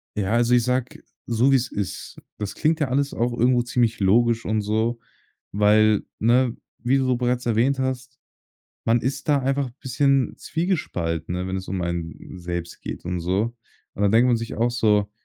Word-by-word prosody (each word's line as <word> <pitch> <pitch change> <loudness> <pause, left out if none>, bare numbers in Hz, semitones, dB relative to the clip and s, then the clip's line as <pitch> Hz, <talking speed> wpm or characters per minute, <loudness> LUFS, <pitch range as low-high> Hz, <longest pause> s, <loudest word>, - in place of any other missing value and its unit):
Ja, 100 -1 -1
also, 120 +1 +3
ich 120 - +3
sage 125 0 -2 0.2
so, 120 +3 +3
wie 135 - +5
es 125 -1 0
ist. 100 -2 -5 0.2
Das 105 -2 -5
klingt 160 +1 +1
ja 150 - +1
alles 140 +2 0
auch 120 +1 0
irgendwo 125 +1 +3
ziemlich 120 -2 0
logisch 115 +4 +3
und 110 0 0
so, 110 +3 0 0.5
weil, 105 +1 +4 0.2
ne, 120 +2 +3 0.2
wie 125 +3 +2
du 135 - +1
so 125 -1 +1
bereits 125 0 -1
erwähnt 120 +4 +2
hast: 130 0 -3 0.7
„Man 115 +1 +3
ist 130 +6 -3
da 145 -1 +4
einfach 135 0 -1
bisschen 135 0 +1
zwiegespalten, 90 - -2
ne, 90 +1 -3
wenn 95 0 -3
es 95 - -6
um 95 -1 -2
einen 85 0 -5
selbst 85 -1 -5
geht - - -6
und 90 0 -3
so.“ 95 +7 -1 0.4
Und 100 - -3
dann 100 +1 +3
denkt 115 +3 +5
man 120 -2 +3
sich 115 0 -5
auch 120 +2 +1
so: 105 -4 +2
115 Hz, 190 wpm, -23 LUFS, 105-130 Hz, 0.7 s, wie